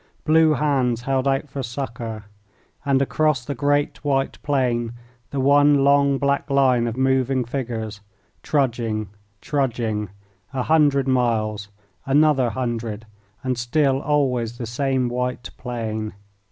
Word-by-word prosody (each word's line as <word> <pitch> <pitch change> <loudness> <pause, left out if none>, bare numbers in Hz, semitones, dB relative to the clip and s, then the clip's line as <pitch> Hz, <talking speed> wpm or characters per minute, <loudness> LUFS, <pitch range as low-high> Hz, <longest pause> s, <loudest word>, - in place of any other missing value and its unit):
Blue 160 0 +5
hands 130 -5 0
held 135 0 0
out 135 +2 0
for 135 0 -5
succour. 115 -3 -5 0.6
And 135 -1 +2
across 150 -3 +1
the 145 - -3
great 145 +3 0
white 135 -2 -1
plain 120 -5 0 0.4
the 140 - -3
one 145 +1 +5
long 140 0 +4
black 140 +2 0
line 130 -4 +3
of 115 +1 -4
moving 130 -1 +1
figures, 115 -4 -4 0.4
trudging, 115 -7 -1 0.3
trudging, 115 -7 -1 0.4
a 130 -2 -1
hundred 145 -3 +3
miles, 110 -5 0 0.4
another 140 -3 +4
hundred, 115 -3 -3 0.4
and 130 -2 -1
still 135 +2 +1
always 125 -5 0
the 120 - -4
same 130 +2 0
white 125 0 -3
plain. 110 -3 -4
130 Hz, 125 wpm, -22 LUFS, 120-140 Hz, 0.6 s, Blue